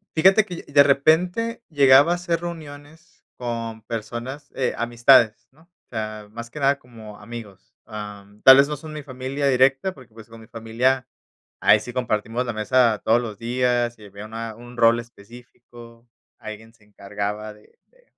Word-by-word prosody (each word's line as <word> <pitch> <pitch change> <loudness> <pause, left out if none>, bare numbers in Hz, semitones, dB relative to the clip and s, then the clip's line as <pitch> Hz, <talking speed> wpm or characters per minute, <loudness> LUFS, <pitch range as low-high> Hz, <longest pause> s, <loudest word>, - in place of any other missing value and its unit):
Fíjate 190 +6 +5
que 180 -4 -8
y - - -15
de 140 0 +7
repente, 180 - +1
llegaba 140 +1 +6
a - - +2
hacer 175 -1 -2
reuniones, 160 -1 -10
con 115 -2 -5
personas, 120 +6 -7
eh, 130 - -1
amistades, 120 -1 +3
¿no? 155 +4 -25
O 175 +1 -38
sea, 110 -2 -6
más 115 +1 -9
que 150 - -8
nada 140 0 +2
como 110 -5 -13
amigos. 105 -3 -11
Am, 105 -1 -10
tal 130 0 +10
vez 140 +1 +5
no 150 -1 -4
son 155 +1 -10
mi 150 - -6
familia 135 +1 -4
directa, 135 +7 +3
porque 125 -5 -17
pues, 115 0 -14
con 115 - -13
mi 110 - -14
familia, 120 +3 -1 0.5
ahí 110 - +5
sí 125 +3 -8
compartimos 120 0 -2
la 120 - -3
mesa 115 0 +2
todos 115 +2 +3
los 110 -4 -6
días. 120 0 -1
Y 105 - -13
había 100 +1 -10
una 110 0 -7
un 120 +1 -13
rol 115 0 +5
específico. 120 +1 -14 0.3
Alguien 110 +1 -10
se 110 -3 -27
encargaba 105 +1 -6
de 105 0 -23
de - - -29
120 Hz, 175 wpm, -22 LUFS, 110-140 Hz, 0.5 s, tal